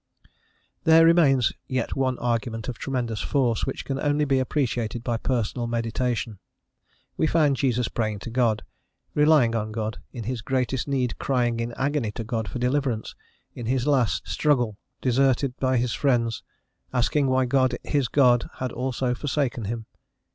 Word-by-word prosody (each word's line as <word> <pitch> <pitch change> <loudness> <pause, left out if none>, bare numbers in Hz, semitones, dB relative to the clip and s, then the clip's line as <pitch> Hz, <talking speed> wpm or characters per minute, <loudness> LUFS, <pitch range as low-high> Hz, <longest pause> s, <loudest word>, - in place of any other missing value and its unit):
There 160 0 +7
remains 145 -8 +4
yet 130 -3 -2
one 130 -2 0
argument 115 -2 -2
of 125 - -5
tremendous 120 -6 -2
force, 125 -6 0
which 135 - -4
can 135 -1 -3
only 145 +1 +1
be 135 -2 +2
appreciated 120 -4 -1
by 120 -2 -1
personal 120 0 -1
meditation. 115 -2 -2 0.8
We 160 - +2
find 150 -4 +3
Jesus 125 -3 +1
praying 110 -2 -2
to 115 - -7
God, 115 -3 +1 0.5
relying 150 -6 +4
on 110 -1 -2
God, 110 0 -3
in 120 - -6
his 120 +1 -3
greatest 130 +2 -1
need 130 -3 -1
crying 120 -3 0
in 115 0 -2
agony 140 -2 -1
to 115 - -5
God 110 -1 -3
for 90 - -5
deliverance, 125 -2 -1 0.4
in 120 - -6
his 130 0 0
last: 130 - +1
struggle, 125 -8 +1 0.3
deserted 130 0 +2
by 130 -1 +1
his 120 0 0
friends, 120 -5 +1 0.5
asking 135 +3 +1
why 130 0 +2
God, 130 -1 +2
his 140 -4 0
God, 125 -3 +3
had 130 -1 -3
also 125 0 -1
forsaken 130 -4 -2
him. 115 +2 -4
125 Hz, 155 wpm, -25 LUFS, 115-135 Hz, 0.8 s, There